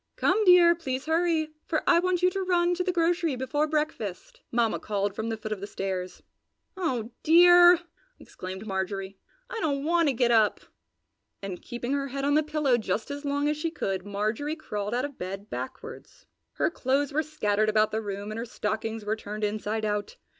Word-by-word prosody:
"Come, 415 +4 +2
dear! 355 -2 +7
Please 270 -5 -4
hurry, 320 -1 +1 0.2
for 315 - 0
I 340 - +5
want 360 0 0
you 365 - +5
to 390 - -2
run 355 -1 +2
to 360 +1 -1
the 365 - 0
grocery 340 -3 +1
before 260 +4 -1
breakfast!" 300 - -3
Mamma 230 -2 +1
called 205 -1 -2
from 220 +2 -3
the 225 - -2
foot 215 0 -7
of 215 - -2
the 200 - -5
stairs. 185 -2 -4 0.5
"Oh 255 - -2
dear!" 350 +1 +7 0.4
exclaimed 190 +3 -8
Marjorie, 195 0 -4 0.3
"I 475 -2 -5
don't 280 -5 -1
want 335 +1 +2
to 280 - +2
get 240 0 +2
up!" 220 -3 +3 0.8
and 190 -2 -5
keeping 240 +2 -4
her 280 -1 -1
head 275 +1 -3
on 285 - +2
the 305 - +5
pillow 300 -5 +1
just 220 +2 -2
as 285 +1 -6
long 285 +1 0
as 300 0 0
she 330 +2 -1
could 195 - -3
Marjorie 215 +9 -2
crawled 210 -8 -4
out 250 +3 0
of 285 -2 -9
bed 195 +3 -6
backwards. 260 0 -8 0.3
Her - - 0
clothes 275 0 0
were 310 - +2
scattered 215 -9 0
about 215 0 +3
the 220 - -1
room 205 0 -5
and 220 - -5
her 230 - -3
stockings 220 0 -3
were 215 +1 0
turned 215 0 -7
inside 215 +1 -1
out. 210 - -2
260 Hz, 195 wpm, -27 LUFS, 210-315 Hz, 0.8 s, dear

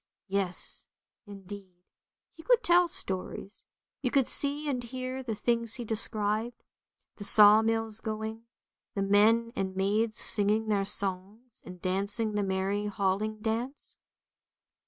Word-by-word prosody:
Yes, 190 -2 -2 0.4
indeed, 195 -2 -11 0.5
he 325 - -14
could - - +2
tell 350 0 +4
stories, 190 - -6 0.3
you 255 - 0
could 270 -1 +2
see 290 +1 -2
and 260 -4 -1
hear 255 +2 -5
the 235 -4 -4
things 230 +1 +1
he 245 -2 -6
described; 215 +1 -3 0.5
the 205 - -8
sawmills 220 +2 +4
going, 220 +1 -5 0.5
the 195 - -1
men 220 +4 +3
and 190 -1 -3
maids 215 +3 0
singing 215 +1 +3
their 200 -2 +1
songs 200 +4 -1
and 180 0 -10
dancing 200 +5 +2
the 210 - 0
merry 195 +1 -1
Hailing 205 +2 -2
dance. 235 +5 -3
215 Hz, 125 wpm, -29 LUFS, 200-230 Hz, 0.5 s, tell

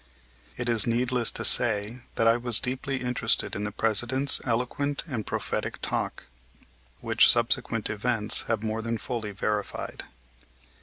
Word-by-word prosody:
It 120 - -4
is 115 -2 0
needless 120 +1 +1
to - - -4
say 110 0 +2 0.2
that 115 - 0
I 115 - +5
was 120 -2 +2
deeply 130 +1 -3
interested 125 -1 0
in 105 - -3
the 105 - -4
President's 120 +6 +2
eloquent 125 +4 -2
and 125 - -5
prophetic - - -3
talk - - -3 0.8
which - - +4
subsequent - - +1
events 105 0 +3
have 115 -2 -2
more 110 0 -3
than 115 0 -3
fully 110 +1 -5
verified. 105 +1 -4
115 Hz, 140 wpm, -26 LUFS, 110-125 Hz, 0.8 s, I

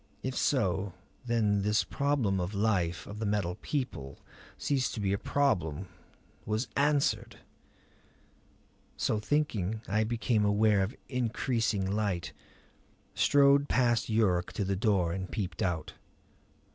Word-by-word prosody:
If 130 0 -3
so, 95 -7 +1 0.3
then 105 -4 +2
this 105 +1 +2
problem 135 -9 0
of 90 +3 -3
the - - -4
life 90 -5 0
of 105 +1 -8
the 110 - -2
Metal 100 -4 0
People 125 - -4 0.4
ceased 135 -3 0
to - - -4
be 100 -1 0
a - - +1
problem; 90 - 0 0.5
was 110 +4 -1
answered! 145 0 +1 1.6
So 110 - 0
thinking 110 -6 -1
I 105 +3 +1
became 115 -1 0
aware 105 0 +3
of 95 +7 -2
increasing 115 -4 0
light; 100 -3 -1 0.8
strode 140 0 +4
past 120 -2 +2
Yuruk 100 -5 +2
to 100 - -2
the 100 +1 0
door 95 -4 +1
and 95 0 -4
peeped 95 -6 -4
out. 85 -4 -1
105 Hz, 130 wpm, -30 LUFS, 95-120 Hz, 1.6 s, strode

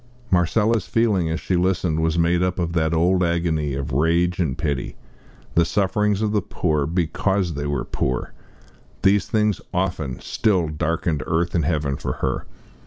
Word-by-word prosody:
Marcella's 105 +4 +2
feeling, 105 -8 +1
as 80 +2 -1
she 95 - -1
listened, 90 -3 +1
was 80 +1 +1
made 85 +1 +2
up 90 0 0
of 85 -2 -1
that 80 -2 +1
old 90 +3 +2
agony 85 -4 0
of 70 -1 -4
rage 85 +6 +2
and 75 -8 0
pity! 70 -4 -2 0.6
The 85 - +4
sufferings 105 +3 +1
of 105 - +1
the 105 -1 +1
poor, 75 -5 -1
because 90 +2 0
they 75 0 -3
were 70 -1 -2
poor 65 -1 -2 0.7
these 100 +1 +3
things 105 -3 +1
often, 85 -8 -2
still, 95 -8 +1
darkened 75 0 -1
earth 85 +2 0
and 80 -4 +1
heaven 75 -3 0
for - - -3
her. 65 -1 -3
85 Hz, 165 wpm, -22 LUFS, 80-95 Hz, 0.7 s, The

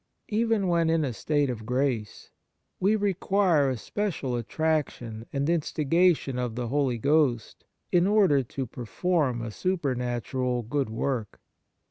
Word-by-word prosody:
Even 225 -2 +1
when 170 -2 +2
in 160 -2 +2
a 130 - -3
state 145 +4 0
of 120 -4 -4
grace, 125 -2 -2 0.5
we 200 +4 +3
require 195 -6 +2
a 130 - -2
special 165 - -3
attraction 120 -4 -2
and 140 0 -1
instiga 165 +1 +2
tion 130 -2 -5
of 120 -3 -2
the 120 -1 -3
Holy 135 -2 +1
Ghost 140 -2 +1 0.3
in 175 +1 +4
order 195 -9 +4
to 130 +2 -5
per 120 +1 -8
form 145 -4 0
a 115 - -5
supernatural 125 - -1
good 135 +2 -1
work. 115 -1 -3
140 Hz, 140 wpm, -27 LUFS, 120-170 Hz, 0.5 s, in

